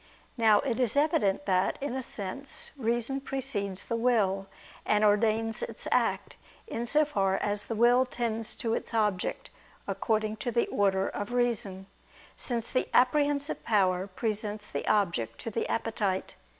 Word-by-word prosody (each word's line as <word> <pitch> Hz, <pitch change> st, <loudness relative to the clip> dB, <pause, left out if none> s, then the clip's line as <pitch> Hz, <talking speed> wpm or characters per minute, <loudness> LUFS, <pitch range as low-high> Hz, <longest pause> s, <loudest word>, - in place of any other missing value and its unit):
Now 220 Hz, -4 st, +5 dB
it 245 Hz, -4 st, -2 dB
is 245 Hz, -2 st, +1 dB
evident 285 Hz, -6 st, +2 dB
that, 185 Hz, -1 st, +2 dB
in 280 Hz, -2 st, -3 dB
a 265 Hz, -, -2 dB
sense, 235 Hz, +4 st, -5 dB
reason 240 Hz, +1 st, -1 dB
precedes 225 Hz, -9 st, -3 dB
the 230 Hz, -, -2 dB
will 210 Hz, -5 st, +1 dB, 0.4 s
and 210 Hz, 0 st, +2 dB
ordains 220 Hz, +1 st, +2 dB
its -, -, -5 dB
act: -, -, +1 dB, 0.3 s
in 235 Hz, -, -4 dB
so 300 Hz, +4 st, +4 dB
far 195 Hz, -9 st, +1 dB
as 205 Hz, 0 st, -1 dB
the 225 Hz, -, -3 dB
will 245 Hz, +3 st, +5 dB
tends 230 Hz, -2 st, -2 dB
to 225 Hz, -1 st, -2 dB
its 230 Hz, -, -3 dB
object, 210 Hz, -4 st, 0 dB, 0.4 s
according 215 Hz, -1 st, 0 dB
to 250 Hz, +2 st, -3 dB
the 235 Hz, -, +2 dB
order 195 Hz, -1 st, +2 dB
of 205 Hz, +3 st, -4 dB
reason, 235 Hz, -6 st, -1 dB, 0.5 s
since 235 Hz, -2 st, -2 dB
the 255 Hz, -, +1 dB
apprehensive 285 Hz, +3 st, +2 dB
power 190 Hz, -3 st, +2 dB
presents 210 Hz, +1 st, -3 dB
the -, -, -4 dB
object 170 Hz, -, +1 dB
to 230 Hz, -, -5 dB
the 230 Hz, -, -2 dB
appetite. 210 Hz, -4 st, -1 dB
225 Hz, 150 wpm, -29 LUFS, 200-245 Hz, 0.5 s, Now